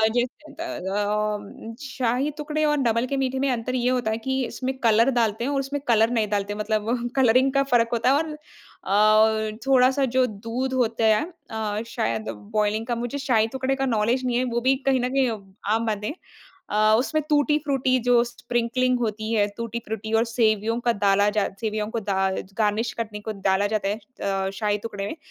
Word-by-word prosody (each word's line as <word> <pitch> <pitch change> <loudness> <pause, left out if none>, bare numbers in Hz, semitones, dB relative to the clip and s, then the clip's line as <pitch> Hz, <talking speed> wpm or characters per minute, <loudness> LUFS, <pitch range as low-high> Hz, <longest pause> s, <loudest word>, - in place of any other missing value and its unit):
जैसे 255 +5 -2
होता 330 - -7
है 320 - -5
अ, 210 +2 -1
उम, 210 +2 -9
शाही 265 +1 -1
टुकड़े 305 +1 -2
और 295 0 +2
डबल 235 -3 +1
के 275 - -2
मीठे 265 0 -1
में 275 - +1
अंतर 245 +1 -2
ये 250 0 +1
होता 245 -4 0
है 220 - -1
कि 265 0 +1
इसमें 260 +2 -4
कलर 230 +2 +5
डालते 225 0 0
हैं 280 - -1
और 275 - 0
उसमें 275 +1 -3
कलर 225 -1 +4
नहीं 225 -3 +1
डालते 205 0 -1
हैं 210 - -8
मतलब 225 +3 -1
कलरिंग 260 +1 +4
का 275 - +3
फ़र्क 230 -1 +4
होता 235 +2 +2
है। 275 - +4
और 315 0 -2 1.2
अ, - - -12
थोड़ा-सा 265 +1 +4
जो 260 - +5
दूध 230 +5 -4
होता 230 -3 +1
है 215 - 0 0.3
अ, 215 -1 -2
शायद 110 - -2 0.3
बॉयलिंग 215 +1 +1
का 240 - 0
मुझे 245 +4 -3
शाही 240 -5 +2
टुकड़े 265 +1 0
का 270 0 -1
नॉलेज़ 235 +2 +1
नहीं 245 -1 +1
है 255 - +2
वो 240 - +1
भी 260 +2 +3
कहीं 265 -1 +4
न 250 - 0
कहीं 270 -2 +3
अ, 220 - -3 0.4
आम 230 +1 -1
बात 210 -2 -2
है। 215 - -2 0.6
अ, 215 +1 +4
उसमें 310 +5 0
टूटी-फ्रूटी 290 -3 +2
जो 245 -1 +4
स्प्रिंकलिंग 245 +1 -1
होती 220 -1 -2
है, 205 -2 +3
टूटी-फ्रूटी 225 -1 -5
और - - +1
सेवियों 225 -1 +1
का 235 -1 +2
डाला 200 0 +3
जा 205 - +3
सेवियों 215 -1 -2
को - - +1
दा 195 -2 0
ज - - -15
गार्निश 220 +2 +1
करने 215 -2 -4
को 220 - 0 0.2
डाला 190 +1 +3
जाता 205 -2 -1
है 205 - 0 0.3
अ, 195 -1 -1
शाही 210 -1 +1
टुकड़े 200 -2 -5
में, 205 - -5
230 Hz, 205 wpm, -24 LUFS, 215-260 Hz, 1.2 s, कलर